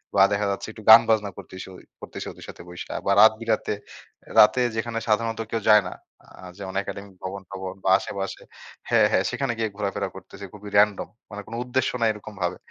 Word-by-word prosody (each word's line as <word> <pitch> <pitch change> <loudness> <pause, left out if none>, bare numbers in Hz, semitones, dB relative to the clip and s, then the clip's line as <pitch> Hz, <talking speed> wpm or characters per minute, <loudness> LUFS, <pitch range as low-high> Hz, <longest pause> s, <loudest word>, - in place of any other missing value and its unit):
বা 100 - +5
দেখা 105 0 0
যাচ্ছে 100 - -4
একটু 110 0 -13
গান 115 +1 +11
বাজনা 105 -2 +2
করতেছি- 95 0 -10 0.3
করতেছি - - -7
ওদের - - -13
সাথে - - -10
বইসা 90 0 -8
বা - - +2
রাত 110 - +8
বিরাতে 115 -2 -1 0.7
রাতে 115 +4 +6
যেখানে 115 0 -2
সাধারণত 115 +1 0
কেউ 115 - -1
যায় 105 -1 +7
না। - - -8 0.3
আ - - -19 0.3
যেমন 95 -2 -7
একাডেমিক 100 0 -8
ভবন-টবন 95 0 -6
বা - - +1
আশেপাশে 100 -1 -5 0.5
হ্যাঁ, - - +5
হ্যাঁ - - +3
সেখানে 135 -4 -2
গিয়ে 110 -1 -1
ঘোরাফেরা 100 -1 -2
করতেছি। 95 +1 -10
খুবই 105 0 -10
র‍্যান্ডম 105 -1 +3 0.2
মানে 105 0 -6
কোন 110 - -10
উদ্দেশ্য 125 +1 0
নাই 115 - +4
এরকম 105 0 -11
ভাবে। 90 +1 -1
105 Hz, 190 wpm, -24 LUFS, 95-110 Hz, 0.7 s, গান